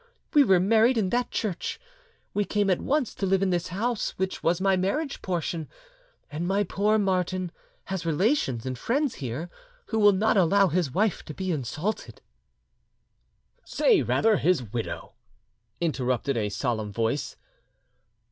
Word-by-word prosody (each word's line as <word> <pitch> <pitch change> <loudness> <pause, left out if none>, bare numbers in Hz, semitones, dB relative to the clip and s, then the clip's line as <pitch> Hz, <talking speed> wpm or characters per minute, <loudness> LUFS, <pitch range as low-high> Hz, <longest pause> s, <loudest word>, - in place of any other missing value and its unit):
We 295 -2 +7
were 190 -8 +4
married 225 +6 +4
in 195 -4 +1
that 245 0 0
church, 200 -6 -3 0.5
we 205 - +1
came 205 -1 +1
at 180 - +1
once 285 -4 0
to 195 - -2
live 195 0 +2
in 190 - +1
this 175 -1 0
house, 220 +5 -2
which 190 0 -2
was 170 +1 +1
my 195 0 +3
marriage 275 - -1
portion, 170 -3 -3 0.6
and 160 +4 -3
my 200 +2 +2
poor 205 +3 +1
Martin 185 -3 0 0.3
has 190 -2 -4
relations 165 - +1
and 130 -1 -3
friends 275 - 0
here 130 +6 -4 0.4
who 220 - 0
will 205 -1 +7
not 210 +2 +2
allow 195 +2 +4
his 170 -3 0
wife 205 - 0
to 150 - -8
be 185 -1 -2
insulted—" 155 - -3 1.4
"Say 445 -8 +3
rather, 220 -2 +2
his 180 -7 +2
widow," 115 -2 -4 0.7
interrupted 135 -5 0
a 105 -3 0
solemn 105 +1 -2
voice. 115 +6 -2
185 Hz, 150 wpm, -26 LUFS, 160-210 Hz, 1.4 s, We